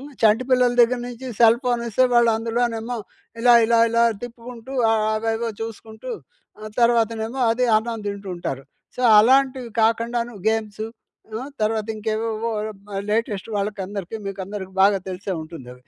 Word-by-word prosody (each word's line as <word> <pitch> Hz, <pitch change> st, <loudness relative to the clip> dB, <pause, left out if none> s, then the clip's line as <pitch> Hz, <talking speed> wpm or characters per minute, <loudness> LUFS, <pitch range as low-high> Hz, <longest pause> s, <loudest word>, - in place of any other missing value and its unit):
హ్మ్. 280 Hz, -, -10 dB
చంటిపిల్లల 250 Hz, +3 st, +4 dB
దగ్గర 245 Hz, +1 st, +4 dB
నుంచి 245 Hz, +1 st, -8 dB
సెల్‌ఫోన్ 240 Hz, +1 st, +4 dB
ఇస్తే 245 Hz, +4 st, +3 dB
వాళ్ళు 235 Hz, -1 st, +5 dB
అందులోనేమో 230 Hz, +1 st, -2 dB, 0.4 s
ఇలా 240 Hz, 0 st, +6 dB
ఇలా 230 Hz, 0 st, +3 dB
ఇలా 230 Hz, 0 st, +3 dB, 0.2 s
తిప్పుకుంటూ, 240 Hz, +1 st, -9 dB, 0.2 s
ఆహ్, 220 Hz, -1 st, +2 dB
అవేవో 225 Hz, +1 st, -1 dB
చూసుకుంటూ 225 Hz, -, -7 dB, 0.7 s
తర్వాతనేమో 230 Hz, +1 st, +1 dB
అది 240 Hz, +2 st, +1 dB
అన్నం 225 Hz, 0 st, -2 dB
తింటుంటారు. 185 Hz, -9 st, -5 dB, 0.3 s
సో, 250 Hz, -, -3 dB, 0.2 s
అలాంటివి 260 Hz, +1 st, +3 dB
కాకుండాను 230 Hz, +1 st, 0 dB
గేమ్స్ 215 Hz, -1 st, -2 dB, 0.6 s
ఆహ్, 260 Hz, +4 st, -6 dB
తర్వాత 215 Hz, 0 st, 0 dB
ఇంకేవేవో 220 Hz, +1 st, -2 dB, 0.6 s
లేటెస్ట్ 215 Hz, -2 st, -1 dB
వాళ్ళకి 200 Hz, 0 st, -2 dB
అందరికి 200 Hz, +1 st, -6 dB
మీకందరికీ 195 Hz, 0 st, -6 dB
బాగా 195 Hz, 0 st, +4 dB
తెలిసే 185 Hz, +1 st, -4 dB
ఉంటుంది 155 Hz, -6 st, -10 dB
అవి. 125 Hz, -, -21 dB
225 Hz, 130 wpm, -22 LUFS, 210-240 Hz, 0.7 s, ఇలా